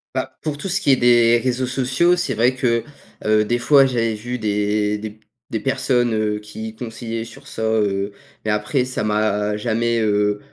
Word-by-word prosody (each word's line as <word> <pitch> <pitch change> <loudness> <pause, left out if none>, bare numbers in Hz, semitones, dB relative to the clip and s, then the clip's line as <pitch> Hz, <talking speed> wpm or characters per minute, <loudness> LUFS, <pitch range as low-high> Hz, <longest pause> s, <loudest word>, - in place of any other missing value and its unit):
Bah, - - -3
pour 150 -2 -3
tout 190 - -5
ce 190 - +1
qui - - +2
est - - +7
des 120 -1 +4
réseaux 130 0 0
sociaux, 135 +7 +2
c'est 140 -8 -2
vrai 120 +4 +2
que, 115 -2 +1 0.4
heu, 110 0 +4
des 120 +3 0
fois, 140 +2 +5
j'avais 115 -3 0
vu 120 +4 -5
des 105 0 0
des 110 +1 -5
p 105 +1 -18 0.3
des 110 - -2
personnes, 120 -1 +1
heu, 105 -1 0
qui 110 +1 -8
conseillaient 115 0 -5
sur - - -13
ça, 110 - -5
heu, 105 -2 0 0.3
mais, 110 - +1
après, 105 +5 0
ça 130 -4 -3
m'a 105 -1 0
jamais, 115 +1 0
heu, 105 -1 +1
115 Hz, 195 wpm, -21 LUFS, 105-125 Hz, 0.4 s, est